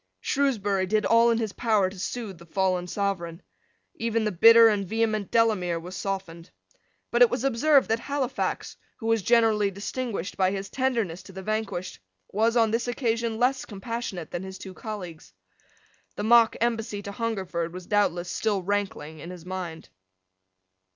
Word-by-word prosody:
Shrewsbury 205 -9 0
did 215 +2 +1
all 230 +1 +5
in 230 - +2
his 220 -3 -2
power 215 -5 +2
to 190 0 -9
soothe 205 -3 -5
the 170 - -13
fallen 185 0 0
Sovereign. 180 -3 -3 0.5
Even 230 0 -1
the 210 - 0
bitter 230 +5 +8
and 205 -2 +2
vehement 215 -1 0
Delamere 210 -7 +2
was 180 +3 -8
softened. 185 -4 -5 0.6
But 240 - +1
it 245 - +8
was - - -2
observed 275 +2 +4
that 225 +1 +1
Halifax, 275 0 -3 0.2
who 225 - -9
was 225 -1 +2
generally 220 -2 +3
distinguished 200 0 -4
by 185 -1 +3
his 195 0 -4
tenderness 230 -10 -1
to 190 - -14
the 190 +1 -7
vanquished, 215 -3 -3 0.3
was, 225 +4 +2
on 225 -2 +4
this 230 +2 0
occasion, 230 -2 -1
less 255 +3 +1
compassionate 205 -4 -5
than 175 - -3
his 190 0 -8
two 190 - -9
colleagues. 180 - -8 0.8
The 205 - -4
mock 230 +1 +5
embassy 225 -3 -1
to 200 - -6
Hungerford 190 -7 -3
was 180 0 -8
doubtless 175 -4 +1
still 200 +1 -1
rankling 190 -6 -3
in 170 - -8
his 180 -2 -10
mind. 180 -3 -6
205 Hz, 165 wpm, -26 LUFS, 185-230 Hz, 0.8 s, bitter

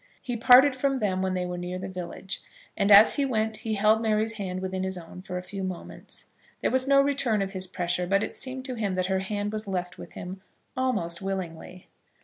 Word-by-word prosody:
He 245 - -4
parted 255 +4 +7
from 270 +1 0
them 190 -5 0
when 190 0 -1
they 180 0 -1
were 180 0 -4
near 180 +1 -4
the 185 +1 -5
village, 185 +1 -5 0.3
and 200 -1 +1
as 205 +2 +8
he 285 - +2
went 220 -4 0
he 220 -1 -3
held 215 +2 +3
Mary's 220 0 +1
hand 190 -4 -4
within 190 0 -3
his 190 0 -3
own 175 +1 -10
for 180 -1 -5
a 180 - -5
few 195 +1 -6
moments. 185 -2 -7 0.4
There - - +1
was 260 +1 +2
no 275 0 +6
return 270 -6 +1
of 195 - -5
his 185 -1 +1
pressure, 180 -1 -1
but 195 +2 +2
it - - -5
seemed 260 0 -4
to 260 - -2
him 210 -5 -2
that 185 0 0
her 190 0 0
hand 205 +2 -3
was 215 0 -4
left 180 -2 -4
with - - -10
him 185 +1 -7 0.3
almost 205 -10 -1
willingly. 185 -2 -5
195 Hz, 225 wpm, -27 LUFS, 185-225 Hz, 0.4 s, as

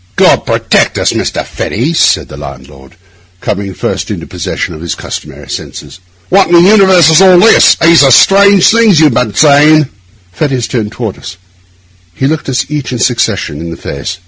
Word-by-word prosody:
'God - - +2
protect - - 0
us, - - -1
Mr. - - -3
Fettes!' 140 +11 -4
said - - +1
the - - -11
landlord, 70 0 -12 0.4
coming 100 0 -4
first - - -4
into - - -6
possession - - -5
of 80 - -11
his 85 - -5
customary - - -9
senses. - - -9 0.3
'What 195 +1 +2
in 175 - -2
the 170 - +6
universe 190 -4 +4
is 160 - +4
all 185 -2 +5
this? 220 +6 +4
These 170 -1 +3
are 135 - +4
strange 200 +5 +4
things 220 -6 +3
you 160 - +4
have 145 - +2
been 110 -3 -2
saying.' 150 +1 +3 0.4
Fettes 130 +3 -3
turned 110 -4 -4
toward 110 -3 -6
us; 95 0 -10 0.8
he 135 - -3
looked 150 0 -3
us 130 - -2
each 150 -3 -5
in 125 - -4
succession 120 - -2
in 85 +1 -7
the 85 - -8
face. 70 +6 -7
135 Hz, 185 wpm, -9 LUFS, -, 0.8 s, the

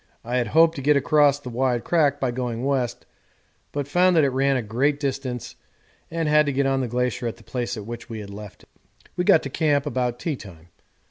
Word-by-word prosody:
I 120 +2 -2
had 120 -2 0
hoped 160 +6 +5
to - - -4
get 145 +1 +4
across 145 0 +4
the 130 -4 -8
wide 125 -1 0
crack 145 -4 +2
by 130 -2 0
going 120 -1 -3
west, 130 -4 -1 0.7
but 145 -1 -3
found 180 +4 +3
that 160 - +5
it 140 - +3
ran 135 +1 +1
for - - +1
a 110 - -11
great 140 +7 +1
distance 135 -3 -4 0.5
and 165 -1 -2
had 150 0 +4
to - - +1
get 140 +1 0
on 135 0 +1
the 125 - -2
glacier 125 0 -1
at 115 - -5
the - - -17
place 125 -1 -4
at 105 - -7
which 120 +2 -8
we 115 -1 -6
had 100 -1 -8
left 105 0 -10
it. - - -23 0.5
We 180 - 0
got 160 - +5
to 135 - -5
camp 145 -2 +1
about 125 -3 -1
teatime. 95 - -6
135 Hz, 230 wpm, -23 LUFS, 120-145 Hz, 0.7 s, hoped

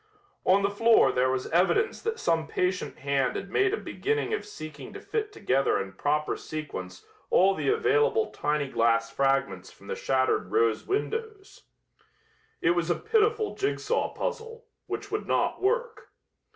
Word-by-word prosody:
On 195 +2 +4
the 200 - +1
floor 230 +3 +5
there 130 +1 +2
was 130 0 -1
evidence 195 - +2
that 455 0 -2
some 165 -1 0
patient 180 0 -2
hand 135 -2 0
had 195 - -5
made 390 -1 +2
a 425 - 0
beginning 440 +1 -2
of 425 - -3
seeking 155 - -9
to - - -7
fit 430 -2 -3
together 135 - +1
in 95 -1 -5
proper 150 +9 0
sequence 95 -13 -7 0.2
all 195 +2 +5
the 195 - -1
available 445 +1 +2
tiny 150 -1 -1
glass 115 -2 +1
fragments 135 +2 0
from - - -18
the - - -4
shattered 130 -1 0
rose 115 -1 +1
windows. 430 0 -4 1.0
It 165 - +3
was 175 -1 0
a 175 - +3
pitiful 440 0 +1
jigsaw 420 +4 -1
puzzle, 465 -1 -5 0.2
which 410 0 -5
would 425 - -3
not - - 0
work. 455 +2 -1
195 Hz, 155 wpm, -27 LUFS, -, 1.0 s, floor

